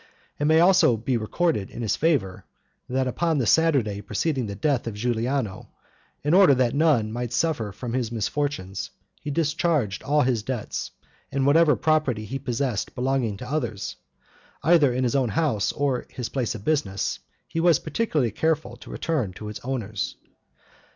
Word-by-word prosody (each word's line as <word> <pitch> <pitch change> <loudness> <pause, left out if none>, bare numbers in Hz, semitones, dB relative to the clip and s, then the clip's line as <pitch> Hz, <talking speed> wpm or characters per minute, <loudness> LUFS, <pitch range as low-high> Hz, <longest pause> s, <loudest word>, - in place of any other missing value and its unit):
It 145 - 0
may 160 +1 +5
also 175 -9 +5
be 120 +4 -1
recorded 115 - 0
in 120 - -6
his 110 - +1
favor, 140 - 0 0.5
that 130 +1 0
upon 160 +5 0
the 130 - +1
Saturday 120 -6 +2
preceding 130 +4 -1
the 100 - -5
death 130 +3 0
of 110 - -4
Giuliano, 120 -1 -2 0.5
in 150 +3 +1
order 185 -7 +7
that 125 -2 +1
none 140 -8 +3
might 120 +1 -3
suffer 120 -7 0
from 115 +4 -6
his 120 -3 -1
misfortunes, 110 -4 -2 0.3
he - - -5
discharged 150 - 0
all 150 +1 +2
his 125 -3 +1
debts; 120 0 -4 0.4
and 135 -1 0
whatever 150 +2 +5
property 150 -9 +1
he 135 +6 -4
possessed 125 -4 -2
belonging 125 -5 0
to 125 - -8
others, 120 -8 -3 0.7
either 155 -4 +5
in 130 +1 -1
his 125 +1 0
own 130 -4 +2
house 130 - +1
or 140 -3 -1
his 125 -3 -5
place 125 -3 -2
of 105 - -9
business, 140 -11 0 0.3
he 165 - -3
was 170 -2 +5
particularly 155 - -1
careful 155 +7 -1
to - - -13
return 140 - -2
to 105 +3 -7
its 105 - -6
owners. 115 -6 -3
130 Hz, 165 wpm, -25 LUFS, 110-155 Hz, 0.7 s, order